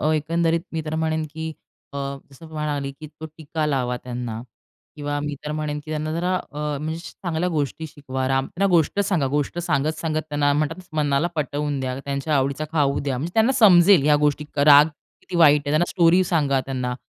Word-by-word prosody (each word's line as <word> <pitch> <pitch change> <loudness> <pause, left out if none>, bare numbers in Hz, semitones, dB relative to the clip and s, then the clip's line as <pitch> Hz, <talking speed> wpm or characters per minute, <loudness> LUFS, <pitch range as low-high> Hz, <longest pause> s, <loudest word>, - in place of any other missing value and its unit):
अ, 155 +1 +2
एकंदरीत 165 +2 +1
मी 160 -1 -2
तर 155 0 -4
म्हणेन, 160 0 0
की 160 0 -4 0.4
अ, - - -7 0.3
जसं 140 +4 -14
मी 160 - -15
म्हणाली, 145 -3 -3
की 155 - -7
तो 155 +1 -10
टीका 155 0 -3
लावा 125 -4 -1
त्यांना 120 -2 -5 0.6
किंवा 145 0 -3
मी 150 0 -3
तर 150 - -3
म्हणेन, 150 -1 -3
की 155 - -9
त्यांना 155 0 -2
जरा 180 +3 0
अ, - - -7 0.3
म्हणजे 160 +1 -3
चांगल्या 175 -1 -3
गोष्टी 160 -1 -2
शिकवा. 130 -3 -5
राम 135 0 +1
त्यांना 195 +3 -1
गोष्ट 170 +3 +2
सांगा. 185 -8 +1
गोष्ट 145 +3 -1
सांगत-सांगत 155 0 -1
त्यांना 145 -1 +1
म्हणतात 160 +5 -2
मनाला 145 0 +1
पटवून 145 0 -2
द्या, 130 0 -3
त्यांच्या 140 +2 -1
आवडीचा 140 +2 0
खाऊ 140 -3 +1
द्या, 135 -3 -2
म्हणजे 165 +6 -4
त्यांना 225 +4 +4
समजेल 185 - +7
ह्या 150 0 +5
गोष्टी. 150 0 +1
क - - -8
राग 145 +1 +9 0.3
किती 180 - -6
वाईट 150 -3 +6
आहे. - - -1
त्यांना, 155 +3 +3
स्टोरी 175 +1 +4
सांगा 145 -6 +1
त्यांना. 125 -2 -3
150 Hz, 195 wpm, -23 LUFS, 140-160 Hz, 0.6 s, राग